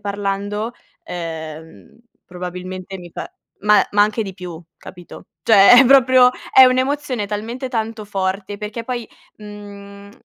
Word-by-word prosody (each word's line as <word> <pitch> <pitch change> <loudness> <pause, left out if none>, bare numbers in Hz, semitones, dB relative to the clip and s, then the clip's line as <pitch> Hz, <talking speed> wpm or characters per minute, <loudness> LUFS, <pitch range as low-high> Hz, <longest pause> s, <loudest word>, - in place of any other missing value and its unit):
parlando, 205 +2 -3 0.3
ehm, 160 +1 -8 0.3
probabilmente 180 +1 -7
mi 175 -1 -12
pa - - -7 0.3
ma 210 +1 +4
ma 205 0 +5
anche 215 +2 0
di 195 -2 -8
più, 175 -3 -9 0.2
capito. 175 -1 -13 0.2
Cioè 220 +3 +7
è 270 - +6
proprio, 255 -1 +6 0.2
è 265 - +9
un'emozione 260 -2 0
talmente 225 +6 -5
tanto 225 -3 -4
forte 195 0 -4
perché, 215 +2 -6
poi, 240 -2 -5 0.3
mhmm, 200 -1 -12
205 Hz, 130 wpm, -19 LUFS, 185-230 Hz, 0.3 s, è